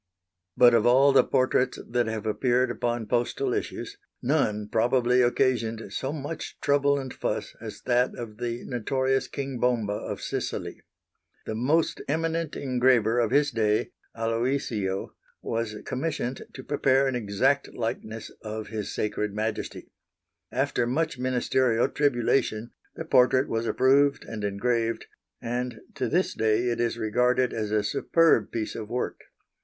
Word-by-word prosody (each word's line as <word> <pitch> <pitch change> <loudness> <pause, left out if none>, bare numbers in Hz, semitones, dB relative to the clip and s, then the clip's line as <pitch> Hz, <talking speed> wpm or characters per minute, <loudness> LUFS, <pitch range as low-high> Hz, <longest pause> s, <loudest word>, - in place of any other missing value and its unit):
But 120 -1 +7
of 115 0 +4
all 135 +3 +6
the 135 - +6
portraits 130 -1 +1
that 120 -1 0
have 110 -1 -4
appeared 125 +3 +1
upon 120 -1 -2
postal 125 - 0
issues, 405 0 -4 0.2
none 115 -7 0
probably 120 +3 +3
occasioned 115 -4 0
so 135 - -2
much 150 +1 -6
trouble 140 0 +2
and 130 -2 -5
fuss - - -3
as - - -8
that 125 0 +2
of 110 -3 -8
the 120 0 -3
notorious 130 +2 0
King 135 -3 -5
Bomba 115 -4 +1
of - - -5
Sicily. - - -4 0.6
The - - -3
most 145 +9 +1
eminent 165 +1 -1
engraver 125 -3 +2
of 115 -2 +2
his 145 +3 +3
day 110 -3 +1 0.3
Aloisio 115 -4 -1 0.3
was 115 -1 -2
commissioned 135 -2 -3
to 130 - -8
prepare 135 -1 +2
an 135 - 0
exact 125 +5 +1
likeness 115 -1 -4
of 110 0 -6
His 110 -2 -4
Sacred 105 -1 -2
Majesty. 110 +1 -4 0.6
After 130 -2 0
much 140 +1 -1
ministerial 125 -1 +2
tribulation 120 -4 0 0.2
the 165 - -6
portrait 130 -2 +4
was 115 +1 -2
approved 140 +3 +3
and 110 -2 -6
engraved, 115 +3 -1 0.4
and 120 -1 -3
to - - -2
this 185 +2 +1
day 110 +2 +1
it 120 -1 -2
is 115 -1 0
regarded 125 +3 +1
as 110 -2 -2
a 105 0 +1
superb 165 +10 +2
piece 110 -2 -3
of 110 -2 -6
work. 125 +1 -3
120 Hz, 140 wpm, -26 LUFS, 115-135 Hz, 0.6 s, But